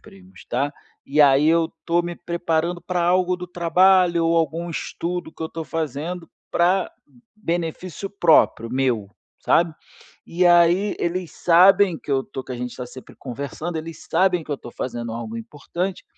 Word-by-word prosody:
primos, 195 Hz, -2 st, -16 dB
tá. 140 Hz, +4 st, -1 dB, 0.3 s
E 145 Hz, +2 st, +1 dB
aí 145 Hz, +1 st, +6 dB
eu 165 Hz, 0 st, +2 dB
tô 170 Hz, +1 st, +2 dB
me 175 Hz, 0 st, -4 dB
preparando 170 Hz, 0 st, -2 dB
pra 175 Hz, 0 st, -2 dB
algo 180 Hz, +1 st, +2 dB
do 180 Hz, 0 st, -7 dB
trabalho 180 Hz, 0 st, +3 dB
ou 165 Hz, 0 st, +2 dB
algum 165 Hz, +2 st, -1 dB
estudo 170 Hz, +1 st, -4 dB
que -, -, -8 dB
eu 160 Hz, -, -3 dB
tô 165 Hz, -1 st, -6 dB
fazendo 165 Hz, +2 st, -4 dB, 0.2 s
pra 180 Hz, +2 st, +2 dB, 0.5 s
benefício 175 Hz, -1 st, -4 dB
próprio, 160 Hz, -, +3 dB
meu, 125 Hz, -6 st, 0 dB, 0.3 s
sabe. 165 Hz, -2 st, +2 dB, 0.5 s
E 180 Hz, +1 st, +1 dB
aí 175 Hz, +4 st, +4 dB
eles 175 Hz, 0 st, -2 dB
sabem 180 Hz, +1 st, +5 dB
que -, -, -10 dB
eu 135 Hz, -1 st, +2 dB
tô 130 Hz, 0 st, -8 dB
que 130 Hz, -, -7 dB
a -, -, -5 dB
gente 125 Hz, 0 st, -5 dB
tá 125 Hz, -1 st, -6 dB
sempre 130 Hz, +1 st, -13 dB
conversando, 140 Hz, +6 st, -5 dB
eles 160 Hz, +1 st, -7 dB
sabem 180 Hz, -3 st, +2 dB
que -, -, -11 dB
eu -, -, -2 dB
tô 120 Hz, -, -10 dB
fazendo 120 Hz, -1 st, -5 dB
algo 115 Hz, -1 st, -5 dB
importante 170 Hz, +10 st, -5 dB
170 Hz, 165 wpm, -22 LUFS, 140-180 Hz, 0.5 s, aí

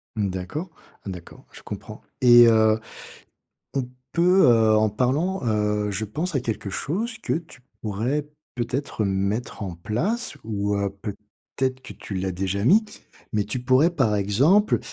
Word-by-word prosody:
Mmh, 105 Hz, -3 st, 0 dB
d'accord. 95 Hz, -, -5 dB, 0.4 s
Ah -, -, -5 dB
d'accord, 90 Hz, -3 st, -10 dB
je -, -, -12 dB
comprends -, -, -8 dB, 0.2 s
et 120 Hz, -1 st, +8 dB
heu, 110 Hz, -1 st, +4 dB, 1.0 s
on 130 Hz, -3 st, -1 dB, 0.2 s
peut 180 Hz, +1 st, +5 dB
heu, 110 Hz, -3 st, +5 dB
en 110 Hz, 0 st, +3 dB
parlant, 140 Hz, -, 0 dB
heu, 105 Hz, -1 st, 0 dB
je 105 Hz, +2 st, -2 dB
pense 155 Hz, -, -4 dB
à 135 Hz, -, +2 dB
quelque 110 Hz, -4 st, -4 dB
chose 215 Hz, -, -3 dB
que -, -, 0 dB
tu 160 Hz, -5 st, -7 dB, 0.2 s
pourrais 120 Hz, +8 st, -1 dB, 0.3 s
peut-être 120 Hz, -1 st, -2 dB
mettre 100 Hz, +5 st, -2 dB
en 95 Hz, -3 st, -4 dB
place 175 Hz, -, -2 dB
ou, 105 Hz, -2 st, -1 dB
heu, 100 Hz, 0 st, 0 dB
peut-être 110 Hz, +5 st, -5 dB
que 130 Hz, -, -9 dB
tu 100 Hz, -, -8 dB
l'as 95 Hz, 0 st, -2 dB
déjà 95 Hz, +2 st, -2 dB
mis, 210 Hz, -, +5 dB, 0.5 s
mais 105 Hz, -1 st, +1 dB
tu 105 Hz, +5 st, -4 dB
pourrais 130 Hz, +6 st, +4 dB
par 130 Hz, -11 st, +1 dB
exemple, 135 Hz, -, +3 dB
115 Hz, 155 wpm, -24 LUFS, 105-140 Hz, 1.0 s, et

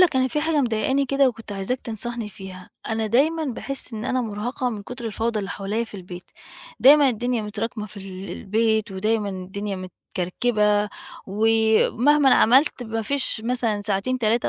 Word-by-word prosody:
لك 345 Hz, -7 st, +5 dB
أنا 260 Hz, 0 st, +3 dB
في 300 Hz, +4 st, -1 dB
حاجة 315 Hz, -1 st, +1 dB
مضايقاني 260 Hz, +3 st, +1 dB
كده 275 Hz, 0 st, +3 dB
وكنت 225 Hz, -3 st, -7 dB
عايزاك 200 Hz, +6 st, -3 dB
تنصحني 230 Hz, 0 st, -5 dB
فيها، 190 Hz, -2 st, -11 dB, 0.2 s
أنا 220 Hz, 0 st, -1 dB
دايمًا 310 Hz, +8 st, +2 dB
باحِس 270 Hz, 0 st, -2 dB
إن 215 Hz, -, -5 dB
أنا 255 Hz, +1 st, 0 dB
مُرهقة 240 Hz, +3 st, -3 dB
من 210 Hz, -3 st, -6 dB
كُتر 245 Hz, +3 st, -8 dB
الفوضى 225 Hz, +1 st, -1 dB
اللي 195 Hz, -2 st, -4 dB
حواليّا 205 Hz, +4 st, -2 dB
في 225 Hz, -, -15 dB
البيت، 180 Hz, -1 st, -9 dB, 0.6 s
دايمًا 285 Hz, +1 st, +7 dB
الدنيا 245 Hz, -1 st, -1 dB
متراكمة 215 Hz, +1 st, -4 dB
في 215 Hz, 0 st, -12 dB
ال 190 Hz, 0 st, -8 dB
البيت 220 Hz, +1 st, 0 dB
ودايمًا 210 Hz, +2 st, 0 dB
الدنيا 195 Hz, +2 st, -5 dB
متكركبة 205 Hz, +3 st, -1 dB, 0.4 s
ومهمًا 225 Hz, +6 st, +3 dB
عملت 265 Hz, +3 st, +4 dB
ما 225 Hz, -1 st, -3 dB
فيش 265 Hz, -1 st, -1 dB
مثلًا 235 Hz, -4 st, 0 dB
ساعتين، 205 Hz, +5 st, 0 dB
3 230 Hz, 0 st, +1 dB
225 Hz, 160 wpm, -23 LUFS, 205-250 Hz, 0.6 s, دايمًا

